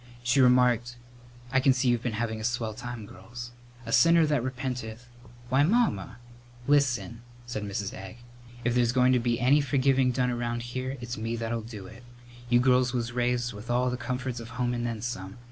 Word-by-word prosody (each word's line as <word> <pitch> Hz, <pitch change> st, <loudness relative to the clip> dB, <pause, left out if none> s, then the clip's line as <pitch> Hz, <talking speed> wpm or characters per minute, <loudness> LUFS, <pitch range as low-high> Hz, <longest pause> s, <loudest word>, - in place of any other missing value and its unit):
She 125 Hz, +3 st, +3 dB
remarked, 125 Hz, -1 st, +3 dB, 0.5 s
"I 135 Hz, -, +4 dB
can 135 Hz, 0 st, +4 dB
see 130 Hz, 0 st, 0 dB
you've 120 Hz, -1 st, +2 dB
been 120 Hz, -2 st, -2 dB
having 110 Hz, 0 st, -2 dB
a -, -, -6 dB
swell 120 Hz, -2 st, -1 dB
time, 120 Hz, 0 st, -7 dB
girls. 120 Hz, +6 st, -10 dB, 0.3 s
A 115 Hz, -, -5 dB
sinner 165 Hz, +4 st, +5 dB
that 145 Hz, -5 st, +1 dB
repenteth 125 Hz, -2 st, -5 dB, 0.2 s
" 120 Hz, +1 st, -20 dB
"Why, 130 Hz, +3 st, +3 dB
Mamma!" 150 Hz, -, +1 dB, 0.5 s
"Listen," 130 Hz, -4 st, +1 dB, 0.2 s
said 120 Hz, -3 st, -4 dB
Mrs. 100 Hz, -1 st, -4 dB
Egg; 95 Hz, +4 st, -9 dB, 0.5 s
"if 120 Hz, +1 st, +1 dB
there's 120 Hz, -1 st, +2 dB
going 130 Hz, 0 st, +4 dB
to 125 Hz, -, +3 dB
be 115 Hz, 0 st, 0 dB
any 140 Hz, +4 st, +4 dB
forgiving 135 Hz, -1 st, +2 dB
done 125 Hz, 0 st, 0 dB
around 120 Hz, -1 st, -2 dB
here, 130 Hz, +2 st, -4 dB
it's 120 Hz, 0 st, -5 dB
me 115 Hz, +1 st, -2 dB
that'll 115 Hz, 0 st, -3 dB
do 110 Hz, -3 st, -9 dB
it. 110 Hz, +5 st, -12 dB, 0.5 s
You 120 Hz, 0 st, +5 dB
girls 125 Hz, 0 st, +3 dB
was 120 Hz, -1 st, -2 dB
raised 120 Hz, 0 st, 0 dB
with 105 Hz, +3 st, -10 dB
all 125 Hz, +1 st, +1 dB
the -, -, -2 dB
comforts 125 Hz, 0 st, -4 dB
of 115 Hz, 0 st, -9 dB
home 125 Hz, -1 st, 0 dB
and 120 Hz, 0 st, -2 dB
then 115 Hz, -2 st, -4 dB
some. 95 Hz, -4 st, -5 dB
120 Hz, 195 wpm, -28 LUFS, 115-125 Hz, 0.5 s, sinner